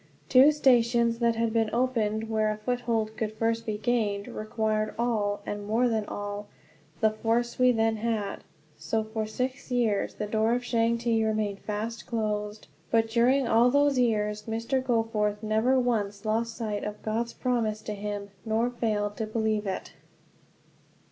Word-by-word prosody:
Two 270 +3 +7
stations 235 -5 +3
that 235 -1 +2
had 230 0 0
been 225 -2 +2
opened, 225 -3 0
where 215 -1 +1
a 215 - -2
foothold 225 -1 -1
could 220 -1 -3
first 225 +1 -1
be 215 -1 -1
gained, 210 -3 0
required 215 0 -2
all, 210 -4 0
and 205 0 -4
more 230 +4 +2
than 220 -3 0
all, 205 0 -5 0.5
the 220 -1 +4
force 230 +3 -1
we 255 0 +6
then 225 -1 +1
had. 215 -3 -2 0.4
So 220 -1 -1
for 220 0 -3
six 255 +5 -4
years 235 -5 0
the 210 - -3
door 220 +2 +1
to - - +1
Changte 235 -1 +1
remained 215 -2 -1
fast 220 +2 -4
closed. 210 -2 -2 0.2
But 225 -1 +2
during 245 +3 +3
all 235 +2 +5
those 285 0 +3
years 210 -3 +1
Mr. 230 +4 -1
Goforth 225 -4 0
never 220 +5 +2
once 210 -4 -1
lost 225 +1 -1
sight 210 -3 -3
of 210 0 -6
God's 230 +2 -2
promise 225 -4 -1
to 210 - -4
him, 205 0 -5
nor 230 +2 0
failed 210 -4 -1
to 220 - -2
believe 215 -1 -1
it. 190 - -4
225 Hz, 160 wpm, -27 LUFS, 215-235 Hz, 0.5 s, Two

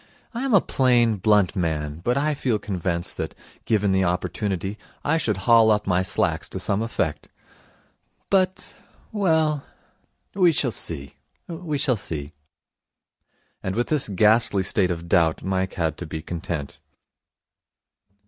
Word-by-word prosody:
I 235 - -3
am 270 -3 0
a 195 - +6
plain, 120 -4 +2
blunt 105 0 +3
man, 80 -4 -2
but 120 +5 +1
I 150 +2 +1
feel 125 -5 0
convinced 90 -4 -3
that, - - -4 0.3
given 105 -3 +2
the 95 0 +2
opportunity, 95 +2 -2 0.3
I 160 +3 +2
should 110 - -1
haul 115 -2 +6
up 105 -1 +2
my 90 -1 +2
slacks 95 - -1
to - - -4
some 100 +1 0
effect. 100 -9 -2 1.0
But 185 -1 +1 0.4
well, 160 -8 +1 0.7
we 180 -4 +4
shall 135 -4 +1
see. 70 -9 -6 0.3
We 165 -3 -4
shall 135 -4 +1
see.' 75 -6 -6 1.3
And 95 0 -3
with 120 +2 -1
this 150 -7 +2
ghastly 105 0 +3
state 95 -1 +1
of 85 -1 -4
doubt 85 -2 +2
Mike 95 0 -1
had 80 -3 -1
to 85 - -5
be 80 0 -6
content. 80 -4 -5
105 Hz, 140 wpm, -24 LUFS, 90-135 Hz, 1.3 s, a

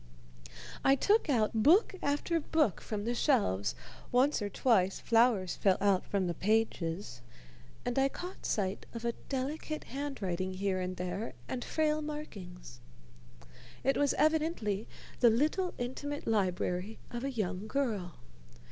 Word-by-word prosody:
I 270 - +6
took 410 - +2
out 225 -6 +2
book 360 - +5
after 290 +4 0
book 300 - +1
from 210 -1 -4
the 240 - 0
shelves, 150 - +1 0.4
once 255 +1 +3
or 205 - -2
twice 195 -3 +2
flowers 225 -6 +3
fell 190 -2 +3
out 195 -2 +2
from 195 -2 0
the 175 - -1
pages 180 - -1 0.6
and 245 +2 0
I 270 0 +3
caught 360 +6 -8
sight 195 -1 -1
of 230 0 -5
a 235 - +2 0.2
delicate 290 +3 -3
handwriting 190 -10 -3
here 190 0 0
and 185 0 -3
there 180 +5 -3
and 250 -2 -3
frail 310 -1 +1
markings. 195 - -8 1.0
It 270 - +3
was 285 -1 +2
evidently 305 - +1 0.3
the 240 - +7
little 310 - +1
intimate 285 +4 -4
library 190 -1 0
of 240 0 -4
a 275 - 0
young 205 -5 -3
girl. 215 - -1
225 Hz, 140 wpm, -32 LUFS, 190-285 Hz, 1.0 s, the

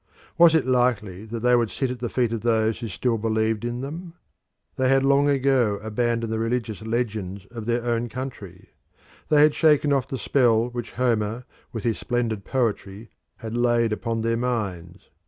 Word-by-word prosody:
Was 170 -2 +6
it 160 - +2
likely 120 -6 0
that 115 +1 -6
they 125 +1 +4
would 120 -2 +1
sit 130 +2 -2
at 125 - -6
the 120 0 -3
feet 120 -3 0
of 115 - -3
those 110 -1 +1
who 115 - -5
still 115 +3 -1
believed 110 0 0
in 120 +1 -3
them? 165 +5 -7 0.6
They 130 0 +1
had 135 0 +4
long 140 +1 +4
ago 130 -6 +2
abandoned 115 +1 -1
the 110 - -1
religious 115 -2 -2
legends 110 -4 -3
of 115 -2 -7
their 120 0 0
own 120 0 -1
country; 110 -8 -8 0.6
they 150 -1 +6
had 150 -1 +5
shaken 150 -2 +3
off 135 -2 0
the 130 - -4
spell 120 0 +2
which 120 -1 -6
Homer 115 -1 -1 0.3
with 115 -4 -5
his 115 -2 -1
splendid 115 -4 -2
poetry 110 -4 -2 0.3
had 110 +1 -4
laid 120 -2 +2
upon 115 +2 -2
their 115 0 0
minds. 100 -9 -4
120 Hz, 180 wpm, -24 LUFS, 110-125 Hz, 0.6 s, Was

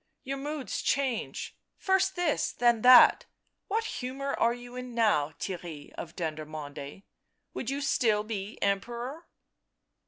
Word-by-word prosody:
" - - -52
Your 275 0 -3
moods 290 0 -4
change 270 -4 -1
— - - -54
first 380 0 +3
this, 350 -4 0
then 240 -2 +3
that; 250 +1 +8 0.4
what 445 +3 0
humour 275 - -4
are 230 - +2
you 245 +1 -8
in 250 -1 -7
now, 180 -11 +2
Theirry 170 -6 -6
of 170 - -8
Dendermonde; 155 -1 -6 0.5
would 240 - -4
you 280 +1 -2
still 220 -6 +2
be 210 -1 -5
Emperor 240 - -2
240 Hz, 135 wpm, -29 LUFS, 195-275 Hz, 0.5 s, that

